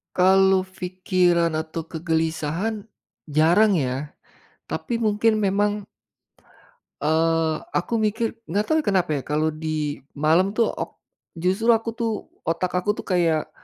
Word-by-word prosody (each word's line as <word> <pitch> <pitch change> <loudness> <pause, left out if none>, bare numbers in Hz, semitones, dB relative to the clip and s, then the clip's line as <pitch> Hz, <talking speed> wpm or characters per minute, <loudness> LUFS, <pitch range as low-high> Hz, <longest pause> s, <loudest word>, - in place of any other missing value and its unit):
Kalau 190 +1 +5
fikiran 180 -3 0
atau 160 +1 -4
kegelisahan, 165 +5 -2 0.4
jarang 165 +8 +4
ya. 135 -1 -2 0.5
Tapi 235 -3 -3
mungkin 215 0 +2
memang 205 0 0 1.2
eee 160 +1 +2 0.2
aku 180 - -1
mikir 220 +2 0 0.2
nggak 205 +5 0
tahu 315 - +4
ya - - -7
kenapa 180 -4 +1
ya, - - -6
kalau 155 +2 +1
di 155 -1 -3 0.2
malam 165 +7 +2
tuh 230 0 +2
ok - - -6 0.5
justru 195 +6 +1
aku 225 +1 -1
tuh, 230 -1 0 0.4
otak 170 +2 0
aku 195 +3 -1
tuh - - -7
kayak, 170 -4 +1
180 Hz, 130 wpm, -23 LUFS, 160-205 Hz, 1.2 s, Kalau